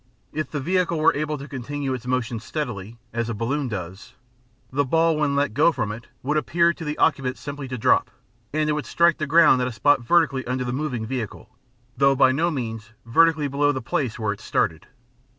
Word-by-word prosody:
If 155 +1 -3
the 150 - -3
vehicle 175 +2 0
were 155 - +4
able 150 +1 -2
to 140 +1 -9
continue 140 0 -4
its 125 -1 -6
motion 125 -2 -1
steadily, 115 -5 -5 0.2
as 115 0 -2
a 115 - -3
balloon 135 +6 -1
does, 95 -3 -7 0.6
the 140 +2 +1
ball 165 +4 +2
when 150 -2 0
let 140 -5 +1
go 150 +6 +4
from 105 -9 -2
it 110 +3 -9 0.2
would 145 +4 0
appear 170 +5 +2
to 170 - -9
the 150 -1 -3
occupant 135 -4 +1
simply 140 -1 -6
to 130 0 -5
drop; 110 - +3 0.4
and 155 +1 0
it 150 - +2
would 150 -1 -3
strike 170 -1 +3
the 155 - -2
ground 155 -4 +5
at 125 - 0
a - - -3
spot 145 +4 +3
vertically 140 0 +2
under 125 0 -1
the 125 -1 -3
moving 130 -5 -2
vehicle, 115 -3 -6 0.4
though 135 +1 +4
by 130 -1 +5
no 160 +6 +1
means 115 -7 -5
vertically 155 +5 +3
below 145 +1 +2
the 135 - -3
place 125 -1 -2
where 110 -2 -1
it 100 - -13
started. 80 +3 -1
135 Hz, 210 wpm, -23 LUFS, 120-150 Hz, 0.6 s, ground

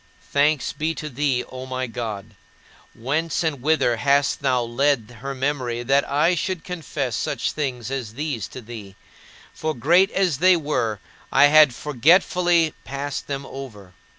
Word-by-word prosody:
Thanks 145 0 +2
to 155 0 -3
thee, 135 -2 0
O 130 0 -9
my 130 0 -3
God. 110 -4 -6 0.6
Whence 150 +8 -1
and 150 -6 -2
whither 140 -5 +2
hast 140 +3 +2
thou 130 -3 +1
led 120 -2 -1
my 135 +1 -4
memory, 130 -3 -2
that 135 +3 +2
I 155 +5 +3
should 180 0 -2
confess 150 -8 -4
such - - -2
things 130 -5 -4
as 120 -5 -4
these 140 -8 -3
to 130 - -10
thee 110 -4 -10 0.6
for 155 -1 -3
great 170 - +4
as 180 -8 0
they 185 +1 +5
were, 115 - -1 0.3
I 145 - +6
had 150 -5 +7
forgetfully 165 +4 +3
passed 140 +1 -5
them 140 -1 -4
over? 110 -10 -10
140 Hz, 150 wpm, -23 LUFS, 120-155 Hz, 0.6 s, had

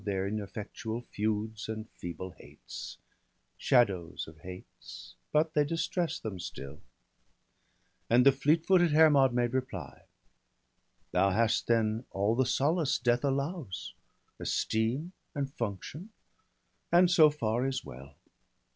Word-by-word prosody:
185 100 -2 -2
Their 95 +1 -1
ineffectual 110 +3 -5
feuds 110 +1 -2
and 110 0 -5
feeble 90 +2 -7
hates - - -9 0.3
— - - -46
Shadows 95 -10 +2
of 80 0 -13
hates, 90 +4 -11 0.2
but 155 +1 +2
they 150 - +4
distress 165 +2 -1
them 105 -5 -6
still/ 70 -4 -8 1.3
And 125 +2 +5
the 140 - +9
fleet 150 +5 +2
footed 175 -4 +4
Hermod 150 -4 +6
made 120 0 0
reply: 110 - -4 0.5
— - - -44
'Thou 95 +2 +3
hast 115 +3 +1
then 115 0 +1
all 100 +3 +1
the 130 0 +2
solace 150 +3 +2
death 120 +1 +1
allows, 140 - -2 0.5
Esteem 120 +10 -1 0.2
and 140 -1 -3
function; 120 - -5 0.8
and 175 +1 +6
so 160 -4 +7
far 120 -3 -1
is 130 -2 -3
well. 65 +3 -11
120 Hz, 130 wpm, -30 LUFS, 100-145 Hz, 1.3 s, the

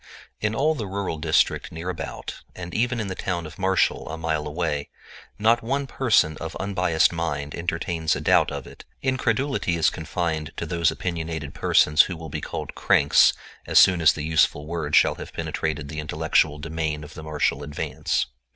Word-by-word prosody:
In 110 +1 -1
all 150 +6 +2
the 115 -9 -4
rural 95 -4 -3
district - - +1
near 80 +2 -7
about, 90 - -7
and 90 -1 -7
even 120 +1 0
in 110 - -2
the 95 - -4
town 90 -2 -3
of 80 +5 -11
Marshall, 95 -3 +1
a 80 - -5
mile 80 -2 -2
away, 75 -2 -2 0.5
not 115 +3 +3
one 135 +4 -1
person 110 - +2
of - - -6
unbiased 90 -5 +1
mind 75 -4 -3
entertains 85 -1 -1
a - - -3
doubt - - +3
of - - -6
it; - - -13 0.2
incredulity 130 -5 0
is 80 - +3
confined 80 -1 -3
to - - -3
those 85 0 +1
opinionated 80 -4 -4
persons 75 -1 +4
who 90 +2 -2
will 80 -1 -8
be - - -4
called - - -5
"cranks" 70 - +4 0.3
as - - +2
soon 90 -2 +7
as 80 - +6
the 75 - -5
useful 80 -1 +2
word 80 -2 -2
shall - - +5
have - - -9
penetrated 75 -2 -3
the 75 +2 -6
intellectual 80 0 +1
demesne 80 -1 -3
of 75 - -11
the - - -9
Marshall 75 -2 -1
Advance. 75 0 -2
80 Hz, 180 wpm, -24 LUFS, 75-95 Hz, 0.5 s, soon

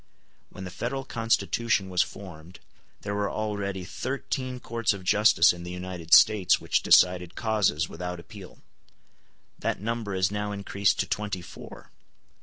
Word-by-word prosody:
When 95 - -10
the 90 - -7
Federal 125 +9 -4
Constitution 115 -3 0
was 90 -1 +1
formed 90 -3 -8 0.4
there 100 - -4
were 100 -1 -1
already 100 -3 -3
thirteen 130 +2 -4
courts 115 -2 -1
of 95 - -10
justice 90 -3 +5
in 85 - -10
the 90 - -7
United 90 -2 -7
States 100 -4 +5
which - - 0
decided 90 -1 +4
causes 100 -8 +1
without 90 +1 -6
appeal. 95 +1 -13 1.0
That - - -2
number 110 -2 -3
is 95 +1 +1
now 105 0 -3
increased 100 0 0
to - - -2
twenty 105 -4 -3
four. - - -12
100 Hz, 145 wpm, -27 LUFS, 90-110 Hz, 1.0 s, justice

